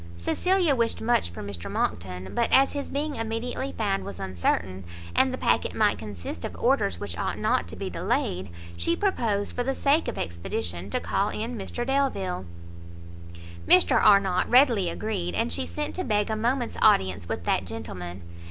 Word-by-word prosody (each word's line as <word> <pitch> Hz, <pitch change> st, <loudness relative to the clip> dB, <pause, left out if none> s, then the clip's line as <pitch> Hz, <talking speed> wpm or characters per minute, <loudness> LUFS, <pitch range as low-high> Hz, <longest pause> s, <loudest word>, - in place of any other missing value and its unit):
Cecilia 360 Hz, -, +2 dB
wished 230 Hz, -2 st, 0 dB
much 220 Hz, -, +1 dB
for 85 Hz, -, -8 dB
Mr 100 Hz, -4 st, -6 dB
Monckton, 90 Hz, +1 st, -3 dB
but 235 Hz, -, +1 dB
as 270 Hz, +1 st, +5 dB
his 285 Hz, -1 st, -4 dB
being 290 Hz, +1 st, -2 dB
immediately 230 Hz, +4 st, -3 dB
found 200 Hz, -3 st, 0 dB
was 100 Hz, -2 st, -7 dB
uncertain, 95 Hz, 0 st, -1 dB, 0.3 s
and -, -, +4 dB
the -, -, -3 dB
packet -, -, +1 dB
might -, -, +2 dB
consist 90 Hz, -5 st, -7 dB
of -, -, -5 dB
orders 85 Hz, -3 st, +1 dB
which 85 Hz, -3 st, -5 dB
ought -, -, -2 dB
not 85 Hz, -, +1 dB
to 85 Hz, -, -7 dB
be -, -, -4 dB
delayed, 90 Hz, +1 st, -1 dB, 0.3 s
she 85 Hz, -, 0 dB
proposed, 225 Hz, -, 0 dB
for 245 Hz, -, 0 dB
the 270 Hz, +2 st, -1 dB
sake 290 Hz, +3 st, +2 dB
of -, -, -3 dB
expedition, 85 Hz, +1 st, -4 dB
to -, -, 0 dB
call 90 Hz, +3 st, 0 dB
in 230 Hz, +3 st, -4 dB
Mr 235 Hz, +3 st, -3 dB
Delvile. 255 Hz, -, 0 dB, 1.2 s
Mr 185 Hz, -, +5 dB
Arnott 195 Hz, -3 st, +4 dB
readily 240 Hz, -8 st, +5 dB
agreed, 90 Hz, -, -3 dB
and 80 Hz, -, 0 dB
she 85 Hz, 0 st, 0 dB
sent 85 Hz, -, -3 dB
to 370 Hz, -, -2 dB
beg 210 Hz, -, +1 dB
a -, -, 0 dB
moment's 240 Hz, +3 st, -1 dB
audience 95 Hz, -, +3 dB
with 85 Hz, -, -3 dB
that 90 Hz, -, +1 dB
gentleman. 90 Hz, -5 st, -7 dB
185 Hz, 175 wpm, -26 LUFS, -, 1.2 s, as